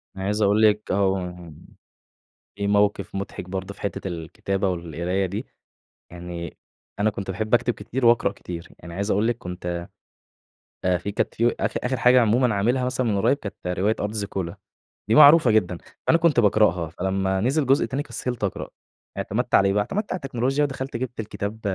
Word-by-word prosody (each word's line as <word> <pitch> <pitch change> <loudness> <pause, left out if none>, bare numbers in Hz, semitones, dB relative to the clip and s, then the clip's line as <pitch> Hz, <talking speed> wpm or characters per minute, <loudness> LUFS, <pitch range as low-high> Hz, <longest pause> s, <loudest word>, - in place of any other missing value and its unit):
أنا 95 0 -5
عايز 105 +2 0
أقول 105 +2 +3
لِك 105 -1 +3
اهم 90 -4 -1 1.0
في 100 0 -2
موقِف 100 -1 +1
مُضحك 95 -2 -5
برضه 95 +1 -4
في - - -18
حتّة 100 -1 -3
الكتابة 95 +3 -2
والقراية 85 +2 -2
دي، 100 +7 -4 0.7
يعني 85 -1 -7 0.4
أنا 110 +1 +3
كنت 100 -2 -5
باحب 110 +4 -4
أكتب 120 0 +3
كتير 120 +4 -3
واقرأ 115 -4 +4
كتير. 85 -4 -8
يعني 85 0 -10
عايز 100 +3 -2
أقول 105 +4 +2
لِك 120 -1 0
كنت 90 -2 -5 1.0
آآ 90 -1 +3
في 100 +5 -5
كانت - - -2
في 120 +1 +2
آخِر - - -1
آخِر 125 0 0
حاجة 125 0 +5
عمومًا 115 0 +3
عاملها 125 +6 +1
مثلًا 130 -1 -1
من 100 -2 +1
قريّب، 135 +8 +3
كانت 100 -6 -7 0.2
رواية 105 +3 +2
أرض 105 +1 -2
زيكولا. 100 -5 -4 0.5
دي 110 - +3
معروفة 150 -3 +8
جدًا، 90 -5 +2 0.3
فأنا 165 - +5
كنت 160 -7 +3
باقرأها، 95 -6 +3
فلمّا 95 +2 -1
نزِل 135 +5 +1
جزء 135 +2 +4
تاني، 140 +2 -2
كسِّلت 125 -6 -4
أقرأ. 95 - -3 0.5
اعتمدت - - -2
على 100 - +6
إيه 95 - +1
بقى، 105 - +3
اعتمدت 205 - -3
على - - 0
التكنولوجيا 135 +3 0
ودخَلْت 135 -2 -4
جِبت 120 -1 -4
الكتاب 105 +1 -5
105 Hz, 180 wpm, -24 LUFS, 95-120 Hz, 1.0 s, معروفة